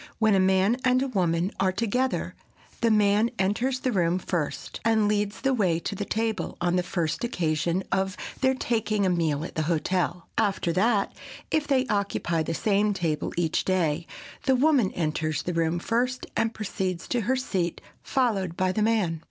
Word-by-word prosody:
When 220 Hz, -2 st, +3 dB
a 195 Hz, -, +4 dB
man 190 Hz, +4 st, +3 dB
and 255 Hz, 0 st, +3 dB
a -, -, -1 dB
woman 180 Hz, -5 st, 0 dB
are 190 Hz, -1 st, +3 dB
together 235 Hz, +6 st, -1 dB, 0.5 s
the 230 Hz, -, +3 dB
man 210 Hz, +1 st, +3 dB
enters 240 Hz, +7 st, 0 dB
the 255 Hz, -, 0 dB
room 175 Hz, -4 st, +2 dB
first, 175 Hz, -4 st, -3 dB
and 220 Hz, -2 st, +3 dB
leads 205 Hz, 0 st, -1 dB
the 270 Hz, 0 st, +2 dB
way 185 Hz, -9 st, +2 dB
to -, -, -3 dB
the 200 Hz, +1 st, -4 dB
table, 220 Hz, 0 st, -2 dB
on 175 Hz, 0 st, +1 dB
the 180 Hz, -, +3 dB
first 175 Hz, -1 st, -2 dB
occasion 170 Hz, -4 st, 0 dB
of 190 Hz, 0 st, 0 dB, 0.2 s
their 265 Hz, 0 st, +3 dB
taking 220 Hz, -5 st, 0 dB
a 185 Hz, -, +2 dB
meal 160 Hz, -3 st, 0 dB
at -, -, -8 dB
the 160 Hz, -, -1 dB
hotel. 175 Hz, +1 st, -1 dB
After 195 Hz, -5 st, +1 dB
that, 200 Hz, +2 st, +2 dB, 0.4 s
if 310 Hz, -2 st, +1 dB
they 265 Hz, -2 st, +2 dB
occupy 200 Hz, -6 st, 0 dB
the 165 Hz, +1 st, -2 dB
same 205 Hz, +1 st, +1 dB
table 165 Hz, -5 st, -1 dB
each 165 Hz, -2 st, +1 dB
day, 170 Hz, -3 st, 0 dB, 0.4 s
the 265 Hz, -1 st, +4 dB
woman 265 Hz, -6 st, +3 dB
enters 155 Hz, -2 st, -1 dB
the 180 Hz, -, -2 dB
room 165 Hz, 0 st, +1 dB
first 245 Hz, +7 st, -1 dB
and 225 Hz, -, +1 dB
proceeds 185 Hz, -5 st, -3 dB
to 245 Hz, -, +1 dB
her 250 Hz, +5 st, +1 dB
seat, 185 Hz, -10 st, -2 dB, 0.2 s
followed 200 Hz, -, 0 dB
by 185 Hz, 0 st, +2 dB
the 215 Hz, -, -1 dB
man. 210 Hz, -7 st, +1 dB
195 Hz, 180 wpm, -26 LUFS, 175-230 Hz, 0.5 s, a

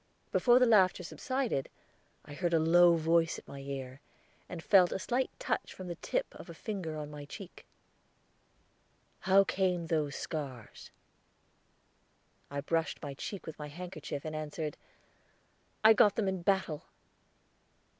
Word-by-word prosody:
Before 245 Hz, -1 st, +5 dB
the 250 Hz, -, +6 dB
laughter 190 Hz, -5 st, +4 dB
subsided, 250 Hz, -, -2 dB, 0.6 s
I 145 Hz, -, -10 dB
heard 170 Hz, +2 st, 0 dB
a -, -, +4 dB
low 170 Hz, +2 st, +6 dB
voice 165 Hz, 0 st, +2 dB
at -, -, -13 dB
my 140 Hz, -, -9 dB
ear, 135 Hz, -1 st, -6 dB, 0.5 s
and 165 Hz, -2 st, -7 dB
felt 180 Hz, +2 st, +5 dB
a -, -, -1 dB
slight 245 Hz, +6 st, -1 dB
touch -, -, -3 dB
from 185 Hz, -1 st, -8 dB
the -, -, -2 dB
tip -, -, 0 dB
of -, -, -12 dB
a -, -, -8 dB
finger 185 Hz, -8 st, -4 dB
on 150 Hz, -1 st, -6 dB
my 150 Hz, -1 st, -8 dB
cheek. 175 Hz, +6 st, -11 dB, 1.5 s
"How 195 Hz, +1 st, +5 dB
came 185 Hz, -3 st, 0 dB
those 155 Hz, -3 st, -1 dB
scars?" 135 Hz, -8 st, -6 dB, 1.6 s
I 140 Hz, 0 st, -3 dB
brushed 165 Hz, +2 st, -1 dB
my 145 Hz, -1 st, -4 dB
cheek 190 Hz, +8 st, -6 dB
with 160 Hz, -, -8 dB
my 150 Hz, -, -5 dB
handkerchief, 155 Hz, -2 st, -7 dB
and 155 Hz, 0 st, -4 dB
answered, 155 Hz, 0 st, -4 dB, 1.1 s
"I 220 Hz, +1 st, +9 dB
got 205 Hz, -2 st, +5 dB
them 215 Hz, -3 st, 0 dB
in 190 Hz, -2 st, -1 dB
battle." 190 Hz, -5 st, 0 dB
170 Hz, 145 wpm, -32 LUFS, 150-190 Hz, 1.6 s, I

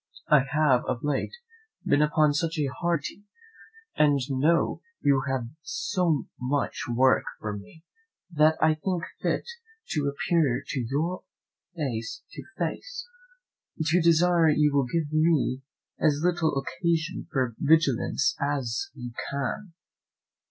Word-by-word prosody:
I 150 Hz, -, +7 dB
have 145 Hz, -5 st, +3 dB
of 120 Hz, -, -3 dB
late 145 Hz, -, -1 dB, 0.5 s
been 145 Hz, +1 st, +3 dB
upon 150 Hz, 0 st, +3 dB
such 165 Hz, +2 st, -1 dB, 0.2 s
hard 170 Hz, -4 st, 0 dB
duty, 200 Hz, -, -7 dB, 0.7 s
and 145 Hz, -2 st, +4 dB
know 150 Hz, +6 st, +2 dB, 0.2 s
you 140 Hz, -2 st, +3 dB
have 130 Hz, -3 st, -2 dB
so 165 Hz, -, -1 dB
much 135 Hz, +3 st, -1 dB
work 130 Hz, +2 st, +4 dB, 0.2 s
for 105 Hz, -1 st, -4 dB
me, 105 Hz, +11 st, -12 dB, 0.5 s
that 155 Hz, 0 st, +4 dB
I 155 Hz, 0 st, +4 dB
think 170 Hz, +2 st, -2 dB, 0.2 s
fit -, -, 0 dB, 0.4 s
to 150 Hz, -5 st, 0 dB
appear 140 Hz, -2 st, +1 dB
to 135 Hz, -, -2 dB
you 150 Hz, +9 st, -2 dB, 0.5 s
face 120 Hz, -8 st, -4 dB
to -, -, -8 dB
face, -, -, -4 dB, 0.8 s
to 170 Hz, +3 st, +3 dB
desire 170 Hz, 0 st, +4 dB
you 150 Hz, -1 st, +3 dB
will 140 Hz, -3 st, +2 dB
give 155 Hz, -3 st, -1 dB
me 155 Hz, -5 st, +2 dB, 0.4 s
as 150 Hz, 0 st, +2 dB
little 170 Hz, -4 st, +1 dB
occasion 165 Hz, +7 st, -2 dB
for 130 Hz, -6 st, 0 dB
vigilance 140 Hz, -2 st, +2 dB
as 135 Hz, -5 st, -1 dB
you 125 Hz, -3 st, -7 dB, 0.2 s
can." 140 Hz, +7 st, -3 dB
150 Hz, 125 wpm, -27 LUFS, 135-165 Hz, 0.8 s, I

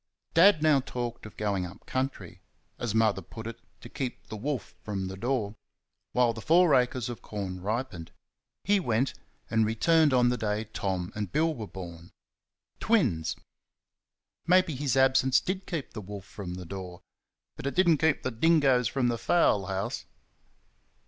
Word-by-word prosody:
Dad 170 Hz, -1 st, +6 dB
now 155 Hz, -3 st, +5 dB
talked 120 Hz, -3 st, -5 dB
of -, -, -15 dB
going 100 Hz, -3 st, 0 dB
up 90 Hz, +2 st, -9 dB
country 130 Hz, +1 st, -4 dB, 0.4 s
as 115 Hz, -3 st, -2 dB
Mother 110 Hz, -3 st, +3 dB
put 110 Hz, +6 st, -10 dB
it, 115 Hz, 0 st, -6 dB, 0.2 s
"to -, -, -9 dB
keep 130 Hz, -2 st, -5 dB
the -, -, -5 dB
wolf 125 Hz, +1 st, -4 dB
from 95 Hz, -3 st, -3 dB
the 95 Hz, -, -6 dB
door" 115 Hz, -1 st, -1 dB, 0.6 s
while 125 Hz, -2 st, +3 dB
the 110 Hz, -, -8 dB
four 170 Hz, +2 st, +5 dB
acres 125 Hz, -2 st, +2 dB
of 120 Hz, -1 st, -6 dB
corn 95 Hz, -3 st, -5 dB
ripened. 100 Hz, -5 st, -3 dB, 0.5 s
He 205 Hz, +1 st, +3 dB
went, 120 Hz, -5 st, 0 dB, 0.4 s
and 110 Hz, -1 st, +3 dB
returned 150 Hz, +8 st, +3 dB
on 125 Hz, -1 st, +4 dB
the 125 Hz, -, 0 dB
day 105 Hz, -1 st, -1 dB
Tom 95 Hz, -4 st, -3 dB
and 105 Hz, -4 st, -4 dB
Bill 160 Hz, -, +2 dB
were 110 Hz, -7 st, -6 dB
born 85 Hz, -3 st, -9 dB, 0.7 s
twins. 90 Hz, -, +1 dB, 1.1 s
Maybe 180 Hz, -2 st, +4 dB
his 135 Hz, -1 st, -1 dB
absence 130 Hz, 0 st, +4 dB
did 185 Hz, +1 st, -4 dB
keep 165 Hz, -6 st, -4 dB
the 110 Hz, -, -6 dB
wolf 100 Hz, -1 st, -8 dB
from 95 Hz, -3 st, -7 dB
the 90 Hz, 0 st, -7 dB
door, 90 Hz, -1 st, -8 dB, 0.5 s
but -, -, -5 dB
it 140 Hz, -, -3 dB
did 185 Hz, 0 st, +4 dB
n't 160 Hz, -4 st, +5 dB
keep 160 Hz, -3 st, +2 dB
the 130 Hz, -, -1 dB
dingoes 135 Hz, -2 st, +3 dB
from 130 Hz, -3 st, 0 dB
the 120 Hz, -1 st, -1 dB
fowl 105 Hz, -, +3 dB
house! 95 Hz, +1 st, -3 dB
120 Hz, 170 wpm, -28 LUFS, 100-140 Hz, 1.1 s, Dad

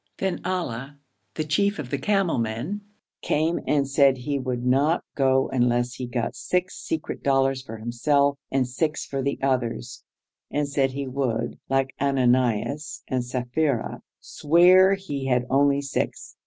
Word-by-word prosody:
Then 190 Hz, -2 st, -2 dB
Ali, 145 Hz, -8 st, -3 dB, 0.4 s
the 155 Hz, -, -1 dB
chief 200 Hz, +7 st, +1 dB
of 135 Hz, -5 st, -6 dB
the 140 Hz, -, -1 dB
camel 195 Hz, -, +1 dB
men, 115 Hz, -, -3 dB, 0.4 s
came 160 Hz, +3 st, +1 dB
and 140 Hz, -2 st, +2 dB
said 140 Hz, -1 st, +4 dB
he 140 Hz, +3 st, -2 dB
would 125 Hz, -2 st, -3 dB
not 140 Hz, +6 st, +2 dB
go 135 Hz, -1 st, +2 dB
unless 120 Hz, -1 st, +1 dB
he 125 Hz, -2 st, -5 dB
got 120 Hz, -1 st, -2 dB
six 180 Hz, 0 st, -1 dB
secret 160 Hz, -1 st, -4 dB
dollars 135 Hz, -1 st, +2 dB
for 115 Hz, -4 st, -8 dB
himself 140 Hz, +5 st, +1 dB
and 130 Hz, -2 st, +1 dB
six 150 Hz, +5 st, -2 dB
for 135 Hz, -1 st, -3 dB
the 140 Hz, +1 st, -1 dB
others, 125 Hz, -, -1 dB, 0.5 s
and 145 Hz, 0 st, -1 dB
said 135 Hz, -2 st, 0 dB
he 140 Hz, +1 st, -3 dB
would 125 Hz, -3 st, -2 dB
(like 135 Hz, 0 st, +1 dB
Ananias 130 Hz, +1 st, +1 dB
and 130 Hz, -1 st, -1 dB
Sapphira) 125 Hz, +1 st, -1 dB, 0.2 s
swear 180 Hz, +5 st, +5 dB
he 145 Hz, -9 st, -5 dB
had 125 Hz, -1 st, +2 dB
only 140 Hz, +1 st, +3 dB
six. 140 Hz, -, -3 dB
135 Hz, 150 wpm, -25 LUFS, 125-150 Hz, 0.5 s, swear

